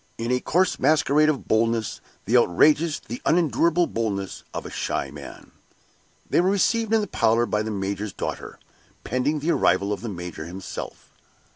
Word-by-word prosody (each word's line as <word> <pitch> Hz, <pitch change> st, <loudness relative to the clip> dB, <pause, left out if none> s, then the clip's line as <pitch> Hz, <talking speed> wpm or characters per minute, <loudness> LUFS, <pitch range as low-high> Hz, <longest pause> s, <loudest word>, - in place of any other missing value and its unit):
in 115 Hz, +2 st, -2 dB
a 125 Hz, -, +2 dB
coarse 180 Hz, +8 st, +1 dB
masquerade 155 Hz, 0 st, +3 dB
of 145 Hz, -4 st, -2 dB
boldness 115 Hz, 0 st, 0 dB, 0.2 s
the 120 Hz, -, +1 dB
outrageous, 150 Hz, -, +4 dB
the 120 Hz, +3 st, -8 dB
unendurable 170 Hz, +1 st, +2 dB
boldness 105 Hz, -, -3 dB
of -, -, -6 dB
a -, -, -7 dB
shy -, -, -3 dB
man. -, -, -11 dB, 0.8 s
They -, -, +3 dB
were 185 Hz, -, +2 dB
received 220 Hz, +3 st, +1 dB
in 225 Hz, -1 st, +4 dB
the 205 Hz, -, -3 dB
parlor 115 Hz, -6 st, +2 dB
by 105 Hz, -2 st, -1 dB
the 110 Hz, -, -3 dB
major's 100 Hz, 0 st, -3 dB
daughter, -, -, -6 dB, 0.5 s
pending 140 Hz, +5 st, -1 dB
the 165 Hz, +4 st, +1 dB
arrival 100 Hz, -, +2 dB
of 100 Hz, -, -6 dB
the 115 Hz, -, -5 dB
major 90 Hz, -4 st, -6 dB
himself. 90 Hz, +3 st, -8 dB
120 Hz, 165 wpm, -24 LUFS, 105-155 Hz, 0.8 s, outrageous